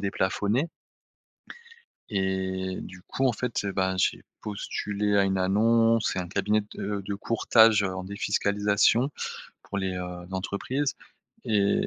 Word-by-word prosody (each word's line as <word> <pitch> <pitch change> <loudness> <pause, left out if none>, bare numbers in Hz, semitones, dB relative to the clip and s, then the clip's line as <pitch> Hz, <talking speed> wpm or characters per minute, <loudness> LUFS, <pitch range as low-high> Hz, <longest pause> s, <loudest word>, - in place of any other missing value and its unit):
déplafonnées. 100 - 0 1.4
Et 95 -1 -1
du 95 0 -10
coup, 135 +8 0
en 125 - +2
fait, 120 -2 -2
heu, 100 - -1
ben, 95 -1 0
j'ai - - +1 0.2
postulé 105 0 -1
à 100 - +5
une 95 0 +1
annonce 115 +4 +3
c'est - - -2
un 90 - -4
cabinet 100 +3 +1
de 100 0 -3
de 100 - -2
courtage, 110 0 +4
heu, 95 -1 -1
en 95 0 -5
défiscalisation 100 +5 +2 0.5
pour 100 - -4
les, 95 -1 -1
heu, 90 -1 -6
entreprises 120 +9 -2 0.5
et 100 -2 +2
100 Hz, 135 wpm, -27 LUFS, 95-110 Hz, 1.4 s, à